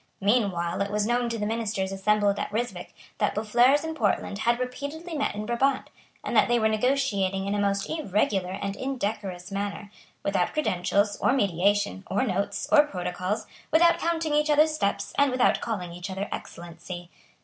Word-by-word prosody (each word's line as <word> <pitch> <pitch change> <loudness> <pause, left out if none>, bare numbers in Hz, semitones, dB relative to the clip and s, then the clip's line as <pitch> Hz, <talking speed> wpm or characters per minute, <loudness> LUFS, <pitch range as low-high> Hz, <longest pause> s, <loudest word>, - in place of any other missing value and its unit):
Meanwhile 195 -5 +1
it 200 - 0
was 210 0 0
known 240 +1 +1
to 230 - -2
the 210 - -2
ministers 215 -3 -2
assembled 205 +1 +1
at - - -3
Ryswick 240 +3 -4 0.2
that - - +1
Boufflers 240 +7 +3
and 320 0 -4
Portland 205 -5 0
had 235 +2 +2
repeatedly 285 +7 -5
met 285 - -1
in 210 +1 -4
Brabant, 260 +4 0 0.3
and - - -3
that - - +5
they 240 -1 +3
were 220 -2 +3
negotiating 215 -5 +1
in 200 - -1
a 205 - 0
most 200 -1 0
irregular 205 - 0
and 200 0 -3
indecorous 205 -8 -4
manner, 200 +1 -4 0.3
without 195 -3 0
credentials, 205 -6 +1
or - - +2
mediation, 200 - +1
or 200 - +1
notes, 195 +2 -2
or 295 -1 +6
protocols, 185 +2 -3 0.2
without 335 +2 +5
counting 325 -2 0
each 300 +1 +2
other's 305 +1 +4
steps, 200 -10 -1
and 285 0 +5
without 255 -1 +2
calling 180 -7 -3
each 180 +3 -6
other 190 +2 -3
Excellency. 175 +1 -8
210 Hz, 170 wpm, -26 LUFS, 195-255 Hz, 0.3 s, or